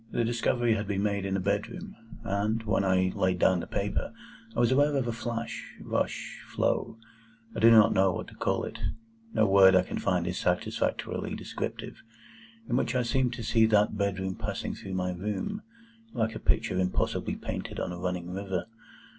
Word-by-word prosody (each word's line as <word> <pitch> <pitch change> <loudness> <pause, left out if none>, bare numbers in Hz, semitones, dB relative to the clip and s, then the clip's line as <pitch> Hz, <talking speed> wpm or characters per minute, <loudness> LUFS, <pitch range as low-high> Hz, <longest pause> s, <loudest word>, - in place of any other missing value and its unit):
The 120 - 0
discovery 120 0 +1
had 105 -1 -2
been 100 -1 -1
made 100 -2 0
in 95 0 0
a - - -1
bedroom, 100 +4 -2 0.3
and, 105 +2 0
when 110 -2 +1
I 95 -1 +2
laid 95 -1 +1
down 90 +1 +4
the - - -5
paper, - - -2 0.4
I - - -1
was 120 0 +4
aware 145 +2 +4
of 130 -3 0
a - - 0
flash—rush—flow—I 115 -1 -4
do 115 - +7
not 110 -2 +7
know 95 0 +4
what - - -4
to - - -15
call - - -1
it,—no 115 0 -3
word 95 -1 +7
I 90 - +5
can - - -4
find 90 -2 +1
is 90 0 -2
satisfactorily 90 0 -1
descriptive,—in 115 +1 -7
which 130 - 0
I 125 - +2
seemed 125 +1 +1
to 120 -1 -6
see 110 0 +4
that 105 -1 +3
bedroom 95 -2 -1
passing - - -4
through 95 -1 -6
my 90 0 0
room, 105 - -3 0.5
like 110 0 0
a 110 - -6
picture 90 - +1
impossibly 90 0 0
painted - - -5
on - - -2
a 90 - -6
running 90 -1 -3
river. 95 -1 -3
105 Hz, 170 wpm, -29 LUFS, 95-115 Hz, 0.5 s, do